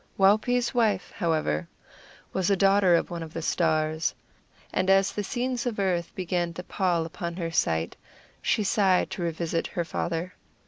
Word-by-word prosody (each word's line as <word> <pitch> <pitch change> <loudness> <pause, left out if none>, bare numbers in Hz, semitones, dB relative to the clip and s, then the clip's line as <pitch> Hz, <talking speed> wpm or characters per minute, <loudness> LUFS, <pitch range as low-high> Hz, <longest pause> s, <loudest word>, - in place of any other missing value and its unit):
Waupee's 220 +5 +3
wife, 215 -6 +1
however, 155 - 0 0.7
was 190 -1 +1
a 200 - +4
daughter 195 -2 +4
of 170 - 0
one 170 -1 -4
of 160 -1 -8
the 165 - -4
stars; 155 -1 +1 0.6
and 185 +1 +1
as 195 0 +4
the 210 - -3
scenes 245 +2 -2
of 230 - -2
earth 180 -4 0
began 175 -2 -1
to 180 - -7
pall 175 -3 0
upon 170 +1 -5
her 170 -2 -3
sight, 80 - 0 0.5
she 215 - +1
sighed 195 -3 +2
to - - -5
revisit 165 0 -1
her 170 - -3
father. 170 +1 -3
180 Hz, 165 wpm, -27 LUFS, 165-195 Hz, 0.7 s, a